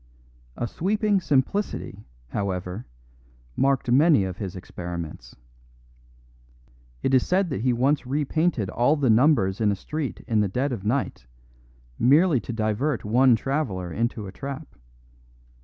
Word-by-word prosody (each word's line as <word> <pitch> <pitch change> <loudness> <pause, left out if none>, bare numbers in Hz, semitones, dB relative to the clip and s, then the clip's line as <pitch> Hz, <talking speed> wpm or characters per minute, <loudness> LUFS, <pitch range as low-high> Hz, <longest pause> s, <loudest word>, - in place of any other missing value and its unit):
A - - -1
sweeping 205 - +1
simplicity, 135 - -1 0.2
however, 95 - -3 0.7
marked 135 -3 +1
many 145 - +5
of 95 -1 -4
his 95 -4 -5
experiments. 85 -8 -7 1.7
It 135 - +1
is 130 - +5
said 185 -2 +1
that 135 - -2
he 125 +1 +2
once 130 +3 +1
repainted 145 - 0
all 125 +6 +3
the 135 -6 +2
numbers 110 -6 +3
in 105 -2 +3
a - - 0
street 150 +7 -5
in 110 -2 +2
the 105 - +2
dead 130 +9 -1
of 110 -6 -4
night 115 - -2 0.7
merely 145 +3 +4
to 120 - -6
divert 115 +5 -1
one 125 +3 +5
traveller 110 - -2
into 115 0 -2
a 95 - -7
trap. 140 +5 -7
125 Hz, 135 wpm, -25 LUFS, 100-145 Hz, 1.7 s, many